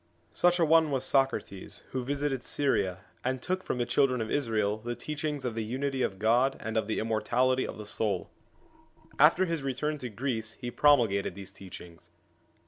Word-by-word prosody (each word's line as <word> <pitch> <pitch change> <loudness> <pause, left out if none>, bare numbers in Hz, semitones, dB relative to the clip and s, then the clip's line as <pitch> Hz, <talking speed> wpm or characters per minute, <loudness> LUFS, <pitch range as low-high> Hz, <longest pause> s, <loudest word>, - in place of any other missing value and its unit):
Such 175 0 +3
an 165 - +4
one 160 0 +5
was 135 -2 -1
Socrates, 130 -9 -1
who 130 -1 -2
visited 140 0 -1
Syria, 100 -10 0 0.2
and 130 +1 -1
took 185 +8 -2
from 130 - -3
the 120 - 0
children 130 -1 +2
of 110 -1 -3
Israel 110 -6 0
the 120 +2 -4
teachings 150 -1 -4
of 120 - -1
the 115 0 -2
Unity 130 +4 -2
of 95 - -1
God 120 +6 +2
and 110 +1 -5
of 110 -2 +1
the 110 - -1
immor 110 -1 0
tality 130 +1 +2
of - - -7
the 105 - -7
soul. 105 -2 -2 0.9
After 165 +6 +6
his 165 -3 -2
return 140 +3 -2
to 125 - -5
Greece 110 -1 -3
he 120 +1 -6
pro 145 +2 +6
mulgated 100 -6 -1
these 100 -1 -9
teachings. 90 -3 -12
125 Hz, 190 wpm, -29 LUFS, 110-140 Hz, 0.9 s, After